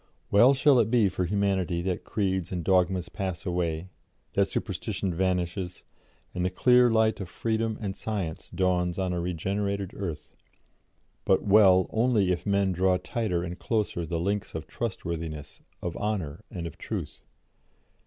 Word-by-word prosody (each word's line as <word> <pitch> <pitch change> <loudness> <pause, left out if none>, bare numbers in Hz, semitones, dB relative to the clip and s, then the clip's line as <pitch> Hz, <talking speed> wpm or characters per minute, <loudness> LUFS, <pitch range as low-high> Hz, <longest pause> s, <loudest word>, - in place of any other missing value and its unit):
Well 120 +7 +6
shall 135 -1 +5
it 110 -2 +2
be 115 -4 +4
for 90 0 -2
humanity 95 -3 0
that 90 -1 -2
creeds 95 -4 -1
and 90 -2 -3
dogmas 90 0 +2
pass 95 -3 -4
away, 85 -1 -2 0.4
that - - +3
superstition 95 -3 -3
vanishes, 90 0 -1 0.5
and 90 - -2
the 90 - +2
clear 125 +6 +5
light 110 -1 +2
of 90 - -6
freedom 110 +1 -1
and 100 -3 -4
science 100 -9 -4
dawns 90 -1 0
on 95 -2 -1
a 90 - -1
regenerated 95 +3 -2
earth 85 -6 -5 0.9
but 95 - +3
well 95 -3 +6
only 110 -5 +2
if 90 +3 -2
men 100 -1 +2
draw 90 +1 +2
tighter 90 -5 -2
and 90 +1 -6
closer 105 -6 -1
the 85 +1 -2
links 100 +2 -2
of 80 - -4
trustworthiness, 85 -8 -5 0.2
of 85 -1 -3
honour, 100 -5 -3
and 90 -5 -5
of 85 - -8
truth. - - -5
95 Hz, 155 wpm, -27 LUFS, 90-105 Hz, 0.9 s, Well